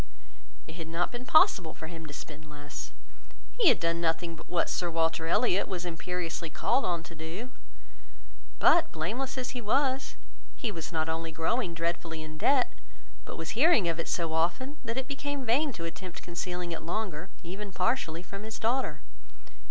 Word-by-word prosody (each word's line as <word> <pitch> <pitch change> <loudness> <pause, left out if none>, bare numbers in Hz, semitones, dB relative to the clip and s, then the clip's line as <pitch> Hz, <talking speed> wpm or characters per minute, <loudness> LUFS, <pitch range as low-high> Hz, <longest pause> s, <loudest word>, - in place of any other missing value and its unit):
It 160 - -9
had 165 -2 -5
not 165 +2 0
been 250 +1 -6
possible 180 - +5
for - - -7
him 165 -1 -7
to - - -8
spend 150 +1 -8
less; 145 0 -7 0.7
he 445 - +6
had 245 - +5
done 165 0 +1
nothing 165 0 0
but - - -13
what 175 -1 +2
Sir 175 - 0
Walter 165 0 +1
Elliot 200 +1 +3
was 180 -2 -3
imperiously 170 -1 -3
called 240 - +2
on 170 -2 0
to 170 - -10
do; 165 +10 -6 1.1
but 340 - +5
blameless 235 +13 -2
as 250 -1 -2
he 250 - -4
was, 260 +4 +2 0.4
he 225 - -2
was 165 -5 -5
not 160 -1 +1
only 165 0 -2
growing 170 +3 0
dreadfully 165 -1 -2
in 155 0 -8
debt, 270 - +4 0.5
but - - -6
was 165 - -3
hearing 250 - +5
of 165 0 0
it 165 - -1
so 165 -2 0
often, 180 - +1
that 230 0 -2
it 265 0 -1
became 280 -1 -3
vain 275 +6 +3
to 165 - -5
attempt 180 +2 -6
concealing 175 0 -3
it 165 - -3
longer, 180 -1 -3
even 195 +4 -5
partially, 180 -7 0
from 195 +2 -7
his 220 +1 -5
daughter. 245 +4 0
175 Hz, 180 wpm, -30 LUFS, 165-235 Hz, 1.1 s, he